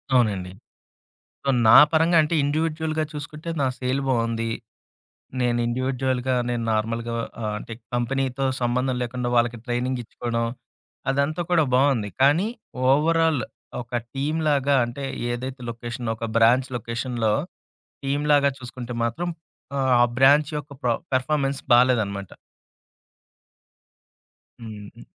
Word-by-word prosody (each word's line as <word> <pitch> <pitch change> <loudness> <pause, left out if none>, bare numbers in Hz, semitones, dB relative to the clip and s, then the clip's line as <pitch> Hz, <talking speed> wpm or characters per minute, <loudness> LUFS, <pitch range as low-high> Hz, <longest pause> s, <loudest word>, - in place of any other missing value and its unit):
అవునండి. 100 -7 +1 0.9
సో, - - -2 0.2
నా 110 - +9 0.2
పరంగా 165 +2 +4
అంటే 155 +2 -1
ఇండివిడ్యుయల్‌గా 155 +1 -1
చూసుకుంటే, 150 +2 -7
నా - - +2
సేల్ 130 +2 -1
బావుంది. 115 -2 0 0.9
నేను 120 -1 +1
ఇండివిడ్యుయల్‌గా 130 +1 -1 0.2
నేను 120 -1 -1
నార్మల్‌గా 115 +2 -1 0.3
ఆహ్, 105 -1 -1
అంటే 115 - -9 0.2
కంపెనీతో 130 +2 -1 0.2
సంబంధం 125 +1 0
లేకుండా 125 0 -3
వాళ్ళకి 120 0 +2
ట్రైనింగ్ 125 +1 -1
ఇచ్చుకోవడం, 115 0 -3 0.7
అదంతా 140 +5 0
కూడా 170 -3 +4
బావుంది. 130 -6 +2
కానీ 150 +8 +4 0.4
ఓవరాల్ 160 +1 +3 0.4
ఒక 120 +1 -11 0.2
టీమ్‌లాగా 145 -1 +1
అంటే 120 +4 -6 0.3
ఏదైతే 130 +2 -5
లొకేషన్, 120 0 -5
ఒక 115 - -6
బ్రాంచ్ 120 +3 +4
లొకేషన్‌లో 115 -1 -1 0.7
టీమ్‌లాగా 145 0 +3
చూసుకుంటే 125 -1 -7
మాత్రం 170 +10 -2 0.5
ఆహ్, 130 -1 +2
ఆ - - +7
బ్రాంచ్ 145 +3 +5
యొక్క 145 0 -9
ప్ర 125 - +2 0.2
పర్‌ఫార్మెన్స్ 135 +1 0
బాలేదన్నమాట. 110 -6 +2 2.3
హ్మ్. 115 - -7 0.3
హ్మ్. - - -13
130 Hz, 110 wpm, -24 LUFS, 120-145 Hz, 2.3 s, నా